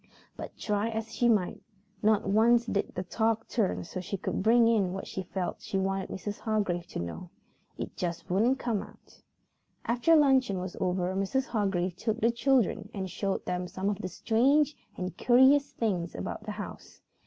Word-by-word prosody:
But - - -8
try 210 +1 -1
as 225 0 -4
she 240 - +2
might, 205 -6 +1 0.4
not 215 0 +3
once 230 +3 +4
did 200 -3 -2
the 185 - -2
talk 225 +3 0
turn 215 -6 0
so 175 +2 -6
she 195 +2 -4
could - - -3
bring 230 +3 +5
in 205 -6 +2
what 195 - -5
she 190 - -5
felt 185 0 -4
she 195 - -3
wanted 195 0 -1
Mrs. 205 +2 -5
Hargrave 200 -6 -1
to - - -6
know. 85 - -6 0.5
It - - -6
just 170 -2 -4
wouldn't 225 +9 +2
come 235 -6 -1
about. - - -15 0.6
After 245 +8 +3
luncheon 265 -9 +4
was 180 0 -5
over 180 0 0
Mrs. 195 +8 0
Hargrave 190 -5 -1
took 220 +3 -1
the 235 0 +3
children 235 -4 +1
and 190 -2 -4
showed 195 -1 -2
them 180 0 -2
some 190 +3 -2
of 200 - -4
the - - -3
strange 275 +10 +2 0.2
and 180 0 -4
curious 265 +3 +5
things 185 -7 -2
about 90 - -5
the - - -4
house. - - -9
205 Hz, 180 wpm, -29 LUFS, 185-235 Hz, 0.6 s, bring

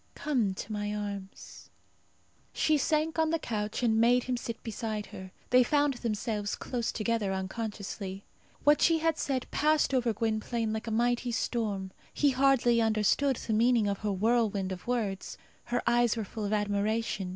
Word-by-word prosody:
Come 235 -10 0
to 200 - -7
my 210 0 -2
arms." 200 -2 -7 0.8
She 310 - +2
sank 310 +3 0
on 320 0 +3
the 330 - +1
couch, 215 -5 -3
and 225 -1 +3
made 245 +1 +4
him 255 - -1
sit 235 -1 -6
beside 220 -2 -4
her. 185 0 -10 0.2
They 250 0 +7
found 290 +2 +2
themselves 215 -3 -2
close 240 -2 -3
together 220 -3 -1
unconsciously. 195 0 -5 0.4
What 295 0 +5
she 330 -1 +4
said 270 -4 -2
passed 305 -2 +2
over 245 -3 +2
Gwynplaine 220 +1 -1
like 220 +1 -4
a - - -1
mighty 240 +2 +1
storm. 210 -5 -2 0.2
He 290 -1 +3
hardly 255 -3 +3
understood 225 +5 +2
the 225 - -3
meaning 230 0 +3
of 200 -1 -1
her 210 -1 -1
whirlwind 205 -1 +1
of 185 +3 -7
words. 215 -6 -2 0.3
Her 245 0 -1
eyes 240 -1 +3
were 220 - -2
full 215 +2 -5
of 200 - -2
admiration. 205 -1 -1
225 Hz, 160 wpm, -29 LUFS, 205-245 Hz, 0.8 s, They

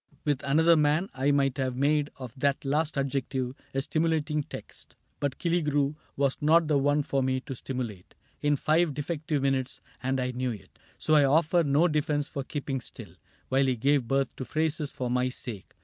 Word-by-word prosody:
With 145 -3 +1
another 160 +4 +5
man 155 +4 +2
I 135 +2 0
might 140 -1 +2
have 130 -1 -1
made 145 +2 +2
of 125 -4 -8
that 140 +1 0
last 150 +2 0
adjective 135 -2 -1 0.2
A 135 - +1
stimulating 155 -1 0
text; - - -11 0.2
but 140 -2 -2
Killigrew 150 -5 +1 0.2
Was 140 -1 +1
not 160 +2 +4
the 150 -2 +3
one 145 +1 +2
for 140 -1 0
me 130 0 +1
to 135 - -6
stimulate 120 -7 -6 0.3
In 145 0 +3
five 155 +1 +2
defective 150 -1 -2
minutes, 135 -2 0 0.2
and 130 +1 0
I 125 0 -1
knew 125 +1 -2
it. 105 - -14 0.2
So 155 - +1
I 150 -2 +6
offer 160 +5 +3
no 145 +4 +3
defense 150 -2 0
for 140 - -4
keeping 135 -2 -3
still 105 -7 -11 0.4
While 135 +1 +3
he 130 - +2
gave 135 +1 +2
birth 135 +1 0
to - - -4
phrases 155 +1 -1
for 125 - -4
my 125 +1 +1
sake. 120 -6 -8
140 Hz, 185 wpm, -28 LUFS, 130-150 Hz, 0.4 s, I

